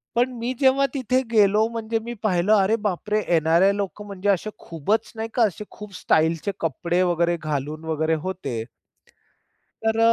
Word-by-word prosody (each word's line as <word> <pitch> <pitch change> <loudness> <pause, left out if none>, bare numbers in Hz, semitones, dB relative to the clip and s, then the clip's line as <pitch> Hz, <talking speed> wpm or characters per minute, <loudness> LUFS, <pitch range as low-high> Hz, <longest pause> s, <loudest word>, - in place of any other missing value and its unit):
पण 245 +2 +2
मी 240 +2 -2
जेव्हा 270 0 +4
तिथे 255 -1 +1
गेलो 210 0 +4
म्हणजे 225 -1 -2
मी 235 +2 -6
पाहिलं, 190 0 +2
अरे 200 +2 +3
बापरे! 210 +1 -1 0.2
एन-आर-आय 165 +5 +4
लोकं 205 +1 -4
म्हणजे 200 0 -3
असे 200 +2 +1
खूपच 170 +7 -2
नाही 225 0 -4
का 240 - +3
असे 210 0 -1
खूप 210 -2 -10
स्टाइलचे 160 +5 +1
कपडे 170 +3 0
वगैरे 175 -1 +1
घालून 155 +1 -3
वगैरे 160 0 0
होते. 140 -12 -4 1.2
तर 220 0 +2
200 Hz, 155 wpm, -23 LUFS, 165-220 Hz, 1.2 s, जेव्हा